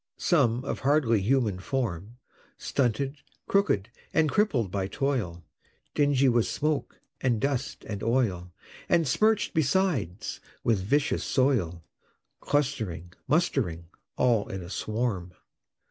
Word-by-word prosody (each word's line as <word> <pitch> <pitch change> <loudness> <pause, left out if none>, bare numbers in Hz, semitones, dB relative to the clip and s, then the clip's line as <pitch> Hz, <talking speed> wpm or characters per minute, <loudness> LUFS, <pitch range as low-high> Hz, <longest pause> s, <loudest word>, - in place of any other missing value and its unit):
Some, 130 -7 +2
of - - -3
hardly 130 -6 +3
human 110 -3 +1
form, 110 -1 -3 0.4
Stunted, 135 +2 -1 0.3
crooked, 125 - +1 0.2
and 155 -3 +3
crippled 135 - +1
by 95 -1 -1
toil; 105 - -2 0.5
Dingy 145 -2 +3
with 120 -2 +3
smoke 150 -1 -2 0.2
and 120 -4 +1
dust 140 +1 -2
and 100 -2 -4
oil, 110 -8 0 0.4
And 170 -3 +3
smirch'd 215 - +2
besides 140 - 0 0.2
with 110 -5 +2
vicious 140 +10 +1
soil, 105 - +1 0.6
Clustering, 110 - -1
mustering, 120 - 0 0.3
all 120 -5 +2
in 95 -2 -5
a 85 - -9
swarm. 105 -6 -2
120 Hz, 115 wpm, -27 LUFS, 100-140 Hz, 0.6 s, hardly